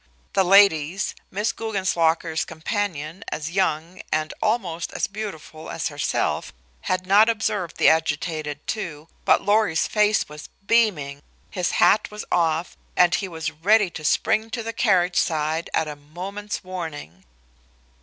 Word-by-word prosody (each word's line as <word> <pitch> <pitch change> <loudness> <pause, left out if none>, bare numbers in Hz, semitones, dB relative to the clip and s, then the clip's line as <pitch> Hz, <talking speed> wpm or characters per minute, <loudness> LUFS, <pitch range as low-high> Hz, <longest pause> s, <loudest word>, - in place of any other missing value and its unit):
The 195 - +4
ladies, 190 -2 +4 0.2
Miss 210 +3 -1
Guggenslocker's 170 -6 0
companion 165 -1 -4
as 155 +1 -4
young 180 -1 -1
and 155 0 -1
almost 195 -7 -1
as - - 0
beautiful 195 -6 -7
as 165 - -2
herself 145 -1 -1 0.4
had 185 0 0
not 205 +4 +6
observed 210 -6 -1
the - - +4
agitated 155 -1 0
two, 165 -8 -5 0.2
but - - +4
Lorry's 205 -5 +2
face 210 0 +2
was 150 0 -10 0.2
beaming, 170 -12 +2 0.3
his 180 -2 -1
hat 210 - +4
was 210 0 -7
off, 165 0 +1 0.2
and 180 -1 +5
he 195 - 0
was 160 -4 -4
ready 195 +5 +3
to 155 - -8
spring 220 +8 +1
to 230 0 -4
the 230 +1 -4
carriage 185 -6 +2
side 160 +1 -1
at 160 - 0
a 150 - -5
moment's 185 +9 -6
warning. 160 - -7
175 Hz, 140 wpm, -23 LUFS, 155-205 Hz, 0.4 s, not